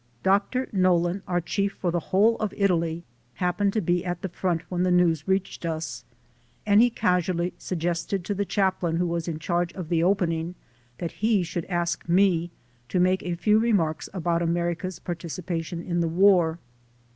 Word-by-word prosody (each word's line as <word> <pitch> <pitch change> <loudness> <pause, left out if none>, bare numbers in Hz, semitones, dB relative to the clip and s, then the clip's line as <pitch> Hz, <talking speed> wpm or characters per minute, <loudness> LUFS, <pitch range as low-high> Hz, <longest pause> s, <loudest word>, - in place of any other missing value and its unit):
Doctor 200 +7 +2
Nollen, 185 -1 +2
our 175 -1 +1
chief 200 +3 -1
for 175 - -2
the 175 - 0
whole 215 +5 +4
of 215 - -3
Italy, 170 -4 +1 0.3
happened 180 +4 0
to 220 - +1
be 175 0 +1
at 175 0 -4
the 190 - -2
front 175 -1 -1
when 180 -1 -2
the 185 - +2
news 175 -3 +2
reached 190 -1 -1
us, 160 -6 -4 0.6
and 205 +1 +5
he 245 - +5
casually 180 -4 0
suggested 175 +1 -2
to 205 - -1
the 200 +1 -1
chap 190 -1 0
lain 170 -2 0
who 175 +2 +1
was 170 -1 -2
in 165 -2 -2
charge 175 +2 -1
of 175 -4 -7
the 170 -2 +2
opening, 170 -2 0 0.4
that 170 - -4
he 215 -4 +3
should 170 -1 -4
ask 175 -2 -2
me 175 -2 +3 0.4
to 185 - 0
make 185 +1 +3
a 175 -1 -3
few 210 +5 +3
remarks 190 -9 +1
about 170 -2 -1
America's 175 +1 -1
participation 170 0 -5
in 175 -1 -1
the 170 - +1
war. 175 -2 +4
175 Hz, 180 wpm, -25 LUFS, 170-190 Hz, 0.6 s, and